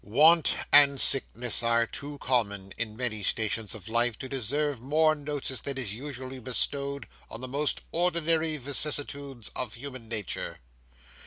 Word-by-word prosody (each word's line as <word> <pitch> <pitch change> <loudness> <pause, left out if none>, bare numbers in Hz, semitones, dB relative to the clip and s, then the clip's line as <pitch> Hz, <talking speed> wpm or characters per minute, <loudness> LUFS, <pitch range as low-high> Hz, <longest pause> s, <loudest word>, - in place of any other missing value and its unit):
Want 155 +9 +4 0.2
and 140 -2 +7
sickness 125 -3 +3
are 115 0 +2
too 145 +4 -7
common 100 -8 -1
in 110 -1 -5
many 120 -4 -2
stations 110 +2 -1
of 105 -2 -11
life 115 0 +1
to 130 - -7
deserve 135 +1 -1
more 155 +4 +2
notice 145 -5 -4
than 140 -1 -4
is 115 -7 -2
usually 130 +1 -7
bestowed 140 +3 +2 0.2
on 115 - -8
the 130 - -5
most 145 +3 0
ordinary 165 -2 +1
vicissitudes 140 -2 0
of 125 -4 -3
human 130 -2 -9
nature. 110 -4 -4
130 Hz, 145 wpm, -27 LUFS, 115-145 Hz, 0.2 s, and